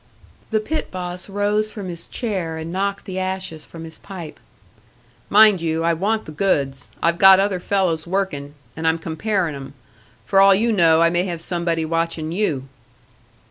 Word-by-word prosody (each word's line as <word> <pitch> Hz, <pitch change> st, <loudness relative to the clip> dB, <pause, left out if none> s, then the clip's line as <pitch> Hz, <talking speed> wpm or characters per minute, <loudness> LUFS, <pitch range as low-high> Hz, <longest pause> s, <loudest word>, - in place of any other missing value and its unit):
The 220 Hz, -, +1 dB
pit 310 Hz, +9 st, -3 dB
boss 180 Hz, +1 st, -6 dB
rose 205 Hz, +2 st, 0 dB
from 200 Hz, -3 st, -7 dB
his 170 Hz, -2 st, -7 dB
chair 185 Hz, -9 st, -3 dB
and 160 Hz, +1 st, -6 dB
knocked 200 Hz, +1 st, -2 dB
the 190 Hz, -1 st, -4 dB
ashes 185 Hz, -4 st, -3 dB
from 165 Hz, -1 st, -10 dB
his 160 Hz, -1 st, -10 dB
pipe. 175 Hz, -6 st, -9 dB, 0.9 s
"Mind 210 Hz, -3 st, +6 dB
you 165 Hz, 0 st, -1 dB
I 170 Hz, 0 st, +3 dB
want 210 Hz, +6 st, -1 dB
the -, -, -8 dB
goods. 140 Hz, -6 st, -1 dB
I've 170 Hz, +1 st, +2 dB
got 190 Hz, -1 st, +8 dB
other 195 Hz, -2 st, +1 dB
fellows 180 Hz, -4 st, 0 dB
working, 160 Hz, -7 st, -2 dB, 0.2 s
and 160 Hz, 0 st, -2 dB
I'm 160 Hz, 0 st, +3 dB
comparing 170 Hz, +1 st, -1 dB
'em. 135 Hz, 0 st, -9 dB, 0.5 s
For 195 Hz, -1 st, +4 dB
all 195 Hz, 0 st, +7 dB
you 230 Hz, +4 st, +1 dB
know, 165 Hz, -5 st, +4 dB
I 165 Hz, -, +4 dB
may 175 Hz, +1 st, +1 dB
have 175 Hz, -3 st, -4 dB
somebody 170 Hz, -1 st, -1 dB
watching 165 Hz, -1 st, -2 dB
you." 160 Hz, -8 st, -1 dB
175 Hz, 175 wpm, -21 LUFS, 160-195 Hz, 0.9 s, got